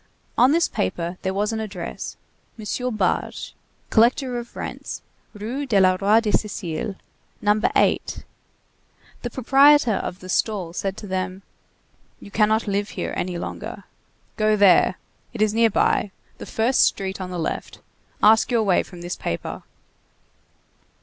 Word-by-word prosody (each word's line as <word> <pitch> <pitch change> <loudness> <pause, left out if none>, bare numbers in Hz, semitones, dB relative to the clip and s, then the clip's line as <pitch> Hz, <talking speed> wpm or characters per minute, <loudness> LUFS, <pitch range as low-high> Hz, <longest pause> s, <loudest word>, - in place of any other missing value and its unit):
On 255 +2 +5
this 335 +2 +3
paper 170 - -3
there 190 - -1
was 205 +3 -1
an 220 - -2
address: 190 -6 -6 0.4
M. 245 +3 -3
Barge, 190 -4 -1 0.4
collector 245 +2 +3
of 240 0 -10
rents, - - -6 0.3
Rue 245 +7 -4
du 220 -5 +2
Roi 195 +3 +4
de 220 -2 -1
Sicile, 200 -2 -2 0.4
No. 210 +1 +2
8. - - +1 1.0
The 240 - -3
proprietor 270 0 +5
of 180 - -4
the 185 - -11
stall 185 -3 -1
said 195 +1 -3
to - - -8
them: 185 0 -3 0.8
"You 200 - -12
cannot 220 +1 +2
live 205 +1 -1
here - - -4
any 180 -1 -2
longer. - - -6 0.5
Go 215 0 +3
there. 190 -3 +5 0.4
It 220 - -3
is 215 -1 +1
nearby. 225 -2 +2 0.3
The - - -8
first 235 +4 +2
street 190 -1 +1
on 185 - -5
the 180 - -5
left. 165 - -4 0.5
Ask 220 +1 +6
your 235 -3 +2
way 190 -4 +3
from 175 -2 -11
this 175 0 -4
paper." 85 - -4
210 Hz, 145 wpm, -23 LUFS, 185-225 Hz, 1.0 s, Ask